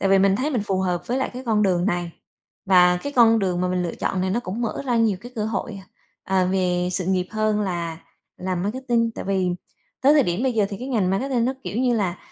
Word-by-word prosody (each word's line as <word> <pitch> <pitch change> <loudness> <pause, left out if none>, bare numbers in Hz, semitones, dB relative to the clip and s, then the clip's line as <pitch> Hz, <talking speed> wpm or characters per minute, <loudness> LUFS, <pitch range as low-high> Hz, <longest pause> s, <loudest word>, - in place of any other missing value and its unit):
Tại 195 - +1
vì 195 - +5
mình 195 0 +3
thấy 280 +6 -1
mình 240 -8 0
phù 190 -1 0
hợp 180 -2 -1
với 250 +2 -1
lại 265 - -1
cái 255 - -7
con 215 -2 +2
đường 180 -3 +2
này 175 -3 -1 0.5
và 180 -1 +5
cái 285 - -4
con 230 -3 +5
đường 185 -3 0
mà 180 - 0
mình 180 0 0
lựa 170 - -3
chọn 185 - -2
này 185 0 0
nó 235 - 0
cũng 220 +2 -5
mở 230 - -3
ra 245 -2 +1
nhiều 220 -5 +2
cái 245 +3 -11
cơ 215 - -1
hội, 220 -1 -3
à, - - -16 0.5
à, 185 - +4
về 180 -1 0
sự 185 -1 -1
nghiệp 185 -1 +1
hơn 215 -1 0
là 170 -4 -3 0.4
làm 185 -1 -3
marketing. 235 +2 0
Tại - - -6
vì 190 -2 0 0.5
tới 275 +2 +5
thời 295 - +5
điểm 175 0 -1
bây 260 -2 +1
giờ 215 -3 +2
thì 200 - -4
cái 255 - -6
ngành 210 -8 +1
marketing 245 +4 0
nó, 260 - +1
kiểu 215 - -3
như, 250 -1 +2
là 185 -5 -1
195 Hz, 265 wpm, -23 LUFS, 180-235 Hz, 0.5 s, vì